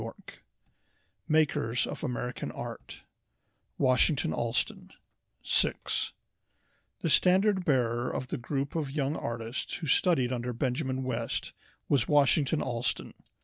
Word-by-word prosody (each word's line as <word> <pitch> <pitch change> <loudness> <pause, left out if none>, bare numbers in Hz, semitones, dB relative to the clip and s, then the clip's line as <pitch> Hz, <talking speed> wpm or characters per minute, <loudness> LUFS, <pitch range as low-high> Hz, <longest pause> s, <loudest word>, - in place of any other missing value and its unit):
Y.] - - -5 1.2
MAKERS 145 -6 +2
OF - - -6
AMERICAN 125 -3 -3
ART - - -8 0.7
Washington 130 - +3
Allston 120 +6 -1 0.5
SIX - - 0 0.9
The 165 - 0
standard 190 +2 +4
bearer 120 -6 +1
of 130 - -4
the - - -2
group 135 +3 -2
of 155 -4 -2
young 140 +1 -1
artists 115 0 -4
who 165 - -5
studied 135 -4 +3
under 125 0 -3
Benjamin 130 +2 -1
West 130 -3 -3 0.3
was 135 -4 +2
Washington 145 +1 +3
Allston. 120 0 -2
130 Hz, 110 wpm, -29 LUFS, 120-150 Hz, 1.2 s, standard